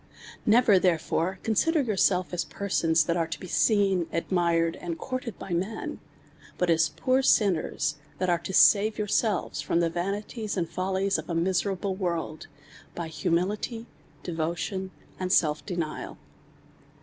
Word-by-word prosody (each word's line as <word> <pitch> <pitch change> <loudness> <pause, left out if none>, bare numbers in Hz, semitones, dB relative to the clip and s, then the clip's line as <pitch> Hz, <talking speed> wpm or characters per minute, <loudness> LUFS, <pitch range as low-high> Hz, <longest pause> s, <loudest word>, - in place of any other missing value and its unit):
Never 220 -3 +6
therefore 180 +1 0
consider 300 - +2
yourseives 185 -5 +1
as 175 - 0
persons 165 -5 +1
that 170 +2 -1
are 165 -2 0
to 160 -2 -5
be - - -8
seen, 195 -2 +2
admired, 170 -1 +1
and 170 -2 -5
courted 255 -2 -5
by 195 - -8
men; 190 +6 -3 0.6
but 180 -1 +2
as 160 -2 +3
poor 260 - +1
sinners, 165 - +2 0.2
that 185 - -1
are 175 -1 +2
to 170 - -6
save 200 +7 +5
yourselves 210 -1 0
from 170 - 0
the 170 -1 +1
va 175 +1 -2
nities 210 +1 -4
and 170 -2 0
follies 190 +2 -1
of 160 - -9
a 170 - -1
miserable 190 +2 0
world, 170 -4 -3 0.5
by 170 -2 -4
humility, 200 +8 -1 0.4
de 175 - -4
votion, 170 +4 -2 0.3
and 185 0 -2
self 150 -3 +3
denial. 170 -5 -4
180 Hz, 150 wpm, -27 LUFS, 165-200 Hz, 0.6 s, Never